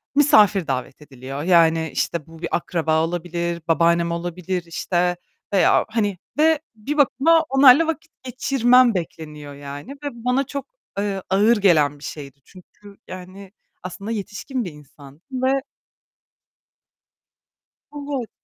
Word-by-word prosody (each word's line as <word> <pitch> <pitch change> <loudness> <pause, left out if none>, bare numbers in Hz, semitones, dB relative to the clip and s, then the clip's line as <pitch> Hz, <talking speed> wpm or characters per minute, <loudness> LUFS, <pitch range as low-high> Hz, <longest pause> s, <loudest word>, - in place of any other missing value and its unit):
misafir 210 - +5
davet 130 +2 -4
ediliyor 135 +1 -8
yani 165 -2 +3
işte 165 -3 -2
bu 165 0 -14
bir - - -2
akraba 160 -2 0
olabilir, 170 0 -3
babaannem 170 +1 +2
olabilir 175 +1 -3
işte 175 +1 -1 0.4
veya 195 - +4
hani 205 -4 -1 0.2
ve 315 0 +4 0.2
bir 280 +8 -5
bakıma 315 +4 +4
onlarla 270 +4 +6
vakit 320 0 -4
geçirmem 255 -2 +3
bekleniyor 150 -4 -6
yani 145 - -9
ve - - -2
bana 250 +3 -1
çok, 280 +1 -6 0.3
eee, 200 -2 -2
ağır 210 +4 +4
gelen 150 -7 +3
bir - - -15
şeydi 140 -2 -8
çünkü 200 +2 -17
yani 185 +1 -10 0.3
aslında 200 +4 -6
yetişkin 225 +3 -4
bir 175 - -6
insandım 145 0 -16
ve 260 +1 +1 2.4
Evet. 280 -5 -4
185 Hz, 125 wpm, -21 LUFS, 160-245 Hz, 2.4 s, onlarla